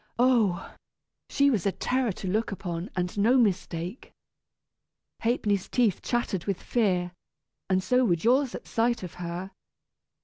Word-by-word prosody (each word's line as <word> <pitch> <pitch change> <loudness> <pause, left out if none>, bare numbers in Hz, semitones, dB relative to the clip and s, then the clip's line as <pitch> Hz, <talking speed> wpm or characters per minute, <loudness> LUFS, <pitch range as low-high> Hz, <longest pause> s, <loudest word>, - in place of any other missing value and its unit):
Oh! 235 -8 +2 0.6
she 280 0 +3
was 205 -7 0
a - - +2
terror 250 +3 0
to 190 - -7
look 215 +5 0
upon, 175 -2 -4
and 180 0 -2
no 235 +6 +4
mistake! 185 -2 -1 1.1
Ha'penny's 210 -5 0
teeth 235 -7 +2
chattered 235 -7 -1
with 195 -3 -1
fear, 185 -7 0 0.6
and 185 0 +2
so 250 +6 +3
would 170 -6 +1
yours 255 +3 +3
at - - -8
sight 235 -2 0
of 180 - -7
her! 175 +2 -5
200 Hz, 140 wpm, -27 LUFS, 180-240 Hz, 1.1 s, no